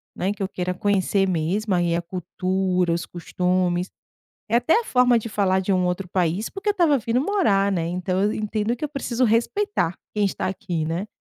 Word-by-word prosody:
né, 190 +2 -1
que 205 - -7
eu - - 0
queira 180 -1 -3
conhecer 195 0 +1
mesmo 185 +5 0
aí 175 -1 +2
a 170 - 0
cultura, 185 0 -1
os 170 +1 -2
costumes, 180 +1 -1 0.6
é 225 - +3
até 245 - +3
a - - -8
forma 250 - +4
de 230 - -5
falar 190 -3 +1
de 190 - -3
um 185 -1 +2
outro 180 +1 -2
país, 180 +3 0
porque 395 +2 -2
eu - - +3
estava 335 -8 +3
vindo 230 +1 0
morar, 260 - +2
né, 170 -4 -1
então 180 +2 -1
eu 210 +1 +2
entendo 215 +1 -1
que 245 - -5
eu - - -1
preciso 260 -4 -1
respeitar 235 - +1 0.2
quem 210 -1 +1
está 195 -1 -1
aqui, 180 -4 -3
né? 170 +5 -2
195 Hz, 205 wpm, -23 LUFS, 180-230 Hz, 0.6 s, forma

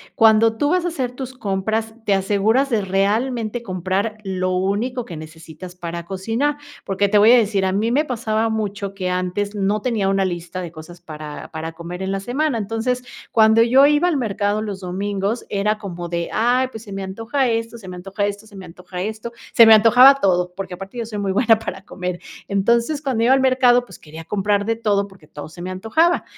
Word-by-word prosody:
cuando 225 0 +4
tú 290 +3 +1
vas 360 -1 +2
a - - -1
hacer 260 -8 -2
tus 260 0 -7
compras, 220 +1 -2
te 200 - +4
aseguras 215 +7 +1
de 215 -3 +2
realmente 215 +5 0
comprar 190 +2 -2
lo 185 -1 -2
único 220 +7 -1
que 170 - -8
necesitas 160 +3 -10
para 170 -1 -6
cocinar. 225 +10 -1 0.3
Porque 200 +1 +1
te 205 +1 +3
voy 215 +2 +6
a - - +7
decir, 200 -4 +1
a 190 - +1
mí 215 +4 0
me 295 +4 +3
pasaba 225 -4 -1
mucho 200 -2 -3
que 185 -2 -2
antes 185 +3 -2
no 205 +1 0
tenía 220 -6 0
una 195 -1 +1
lista 175 0 -4
de 170 -2 -6
cosas 170 +2 -12
para 155 -3 -9
para 160 0 -5
comer 175 +2 -8
en 190 0 -2
la 195 - -1
semana. 255 +5 -1
Entonces, 225 +4 -2 0.3
cuando 220 0 +5
yo 260 +4 +6
iba 295 +4 +3
al 320 -5 +1
mercado 210 -2 -1
los 200 -3 -5
domingos, 200 +4 -3
era 210 +2 0
como 175 -4 -7
de: 170 -1 -3
"Ay, 250 +3 +2
pues 220 - -8
se 205 -3 -12
me 195 0 -4
antoja 225 +8 -1
esto, 230 0 -2
se 195 -4 -12
me 180 - -7
antoja 195 +3 -3
esto, 205 +1 -5
se 205 - -16
me 190 -1 -9
antoja 180 +1 -7
esto", 220 +2 -5 0.2
se 230 -1 +8
me 220 - +10
antojaba 245 +5 +7
todo, 180 -6 +1
porque 190 -2 -5
aparte 195 +6 -9
yo 230 - -3
soy 210 -2 -6
muy 195 -1 -1
buena 225 +1 +4
para 190 -3 -6
comer. 180 -1 -5 0.3
Entonces, 235 +9 +1
cuando 255 -5 -1
iba 260 - +5
al 270 - +3
mercado, 255 -2 +4
pues 190 -7 -14
quería 160 +1 -11
comprar 205 +2 0
de 225 0 -1
todo 200 -3 0
porque 180 -6 -19
todo 150 0 -9
se 175 +2 -12
me 185 - -5
antojaba 315 - +1
205 Hz, 215 wpm, -20 LUFS, 185-230 Hz, 0.3 s, me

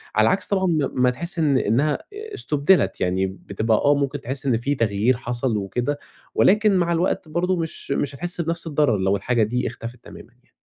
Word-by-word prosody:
على 110 - +5
العكس 190 - +1
طبعًا 190 -2 +1
ما 155 -6 +1
ما 125 0 +3
تحسّ 170 +8 -4
إن 145 -4 +3
إنّها 140 +7 +1
استُبْدلت، 195 - +1
يعني 95 +1 +1
بتبقى 100 +3 -1
آه، 145 +5 +3
مُمكن 140 0 -2
تحسّ 135 +3 -4
إن 125 -4 +2
في 140 +5 -1
تغيير 115 +1 +1
حصل 120 -1 -2
وكده، 120 +8 -2 0.4
ولكن 210 +1 +4
مع 170 -1 +1
الوقت 170 0 0
برضه 180 +3 0
مش 160 -4 -5
مش 140 0 -1
هتحسّ 175 +3 -3
بنفس 165 +1 -2
الضرر 145 -7 +2
لو 95 +1 +1
الحاجة 120 +2 +1
دي 125 +4 -1
اختفت 115 +1 -7
تمامًا - - -13
يعني. - - -35
140 Hz, 190 wpm, -22 LUFS, 115-170 Hz, 0.4 s, على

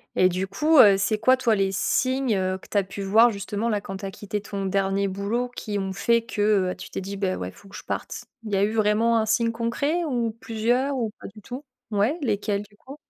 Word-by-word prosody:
et 185 - +5
du 185 +2 -2
coup, 300 +11 +2
heu, 205 -6 +9
c'est 210 +2 +1
quoi 255 +4 +4
toi, 230 -4 +2
les 195 -1 +1
signes, 255 +4 +1
heu, 185 0 -1
que - - -16
tu 205 - -1
as 200 - +4
pu 190 +1 -8
voir 225 +5 +5
justement, 205 +2 -3
là, 210 -3 0
quand 195 0 -6
tu 195 - -7
as 195 - -4
quitté 205 +1 -5
ton 200 -1 -4
dernier 195 +1 0
boulot 205 +6 -2
qui 205 -2 -3
ont 190 0 -3
fait 235 +4 +2
que 205 -4 +1
heu, - - -5
tu - - -10
t'es - - -4
dit: 200 +1 -6
«Beh, 190 -2 0
ouais, 90 - -5
faut 200 - -18
que 195 - -13
je - - -8
parte?» - - -5 0.2
il 215 - -7
y - - +1
a 195 - +2
eu 215 +2 +1
vraiment 225 +2 +2
un 220 - +2
signe 230 +1 +1
concret? 280 +9 -1
Ou 240 -5 0
plusieurs? 240 +6 0
Ou 230 -4 -2
pas - - -8
du 215 - -13
tout? 260 +7 -8 0.3
Ouais, 215 +12 +1
lesquels 205 -4 -1
du 205 0 -15
coup? 270 +5 -11
210 Hz, 255 wpm, -24 LUFS, 195-235 Hz, 0.3 s, heu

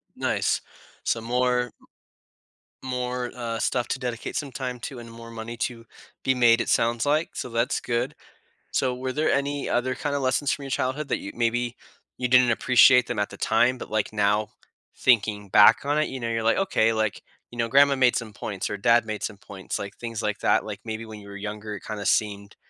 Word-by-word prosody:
Nice, - - 0 0.4
so 115 - 0
more 125 +1 +1
m 120 - -14 1.2
more, 125 -1 -2
uh, 115 -2 -4
stuff 125 -2 0
to - - -2
dedicate 120 -2 -4
some 140 -2 -3
time 125 -1 -4
to 125 +1 -7
and 115 -1 -10
more 115 0 -11
money 115 +1 -7
to 115 0 -4 0.4
be 130 - +3
made, 120 -2 +5
it - - -3
sounds 115 +1 +2
like, 150 +3 +1
so - - -4
that's 115 +1 0
good. 125 +4 -2 0.6
So, 130 -1 0
were 130 +1 -3
there 155 +4 0
any 140 0 -1
other 125 +1 0
kinda 145 +2 -2
lessons 135 +1 +1
from 145 - -3
your 135 - -6
childhood 135 +3 -2
that - - +1
you - - -7
maybe 120 +1 0 0.4
you 125 - -1
didn't 125 -1 +6
appreciate 125 +1 +5
them - - -3
at 105 - 0
the - - -10
time, 120 +3 +2
but, - - -9
like, 110 0 -1
now, 105 0 +1 0.5
thinking 105 -4 +2
back 105 +6 +7
on 145 +1 +1
it, 155 - +1
you 135 - -6
know, 115 - -2
you're 115 -1 -1
like, 115 - +3
"Okay, 115 -13 +2
like, 110 -2 -1 0.3
you 120 - -11
know, 115 0 +1
grandma 140 +3 +5
made 125 -2 +4
some 115 -2 -3
points 100 -2 -4
or - - -3
dad 115 +3 +4
made 110 -1 -4
some 105 - -3
points," 95 -1 -6
like, 100 0 -7
things 115 -2 -5
like - - -2
that, - - +3
like, - - -6
maybe 110 0 -5
when 110 -1 -9
you 100 - -13
were 100 - -9
younger, 105 +1 -5
it 100 - -10
kinda 105 -2 -5
seemed, 100 -1 0
120 Hz, 215 wpm, -25 LUFS, 110-130 Hz, 1.2 s, back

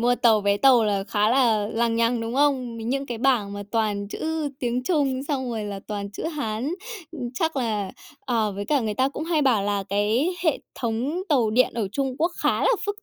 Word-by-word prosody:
mua 245 +1 +3
tàu 225 -4 +4
vé 200 0 +2
tàu 245 0 +5
là 200 -2 0
khá 210 +1 +1
là 230 -5 +3
lằng 230 0 0
nhằng, 230 0 +2
đúng 230 +2 -4
không? 265 -4 +1
Những 270 +5 -2
cái 235 -2 -4
bảng 235 -6 +2
mà 205 0 -5
toàn 210 -3 0
chữ 315 +4 -2
tiếng 245 0 -1
Trung 275 -4 +1
xong 260 -4 -1
rồi 220 -2 -3
là 200 -1 -5
toàn 200 -1 -4
chữ 205 - -7
Hán. 285 -1 -2 0.6
Chắc 320 +1 -1
là 210 -6 -1 0.3
ờ, 225 -5 0
với 200 +1 -4
cả 285 +4 +2
người 215 -3 -2
ta 260 +4 +2
cũng 295 +2 -5
hay 325 -2 +1
bảo 245 -7 +3
là 200 -1 0
cái 220 - +1
hệ 315 - +3 0.2
thống 250 +9 -2
tàu 245 -8 +3
điện 250 +3 +3
ở 220 -5 -1
Trung 270 0 -1
Quốc 335 +3 +2
khá - - +2
là - - +3 0.2
phức 410 +1 -4
235 Hz, 215 wpm, -24 LUFS, 210-275 Hz, 0.6 s, tàu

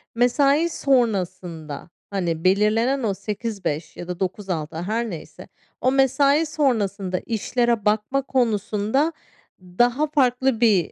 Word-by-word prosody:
mesai 280 +7 +3
sonrasında, 185 - -1 0.2
hani, 170 -5 -2
belirlenen 220 +7 +2
o 205 - +1
08.00-17.00 200 -7 -4
ya 175 - -7
da 180 -1 -5
09.00-18.00 185 -5 -3
her 225 +4 -2
neyse, 155 -3 -9 0.3
o 255 - +3
mesai 275 +3 +3
sonrasında 205 - 0
işlere 235 0 -1
bakma 215 +6 +1
konusunda 230 +3 0 0.5
daha 240 +11 +1
farklı 260 -4 +1
bir, 200 -8 +3
220 Hz, 110 wpm, -23 LUFS, 185-260 Hz, 0.5 s, mesai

